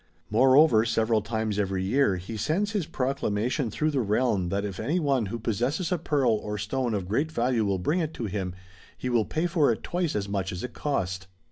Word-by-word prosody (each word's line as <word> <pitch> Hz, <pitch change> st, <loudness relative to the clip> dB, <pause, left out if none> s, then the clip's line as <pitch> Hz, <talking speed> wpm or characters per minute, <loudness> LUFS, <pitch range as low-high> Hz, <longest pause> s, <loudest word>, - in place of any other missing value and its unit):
More 130 Hz, +4 st, +5 dB
over 140 Hz, -7 st, +6 dB
several 115 Hz, -1 st, +1 dB
times 110 Hz, 0 st, -2 dB
every 95 Hz, -2 st, 0 dB
year 105 Hz, 0 st, +2 dB
he 90 Hz, +5 st, -6 dB
sends 180 Hz, -, 0 dB
his 200 Hz, -8 st, -1 dB
proclamation 125 Hz, -4 st, -1 dB
through 155 Hz, +8 st, 0 dB
the 140 Hz, -, 0 dB
realm 105 Hz, -4 st, +1 dB
that 100 Hz, +2 st, -1 dB
if 95 Hz, -3 st, -5 dB
any 170 Hz, +5 st, 0 dB
one 135 Hz, -, +1 dB
who 115 Hz, -, -4 dB
possesses 125 Hz, -, -1 dB
a 180 Hz, -, +1 dB
pearl 145 Hz, -5 st, +2 dB
or 105 Hz, -1 st, -2 dB
stone 115 Hz, +3 st, -1 dB
of 95 Hz, -3 st, -3 dB
great 140 Hz, -, 0 dB
value 120 Hz, -5 st, +1 dB
will 100 Hz, -1 st, +1 dB
bring 150 Hz, -, 0 dB
it 160 Hz, -3 st, -1 dB
to 115 Hz, -, -4 dB
him, 95 Hz, -3 st, -3 dB, 0.4 s
he 125 Hz, -, -3 dB
will 115 Hz, -3 st, +2 dB
pay 160 Hz, +2 st, -1 dB
for 165 Hz, -7 st, +3 dB
it 110 Hz, -, -4 dB
twice 175 Hz, -3 st, -1 dB
as 100 Hz, -1 st, -1 dB
much 100 Hz, -1 st, -2 dB
as 90 Hz, -, -5 dB
it 125 Hz, -, -5 dB
cost. 95 Hz, -9 st, -2 dB
115 Hz, 220 wpm, -27 LUFS, 100-140 Hz, 0.4 s, over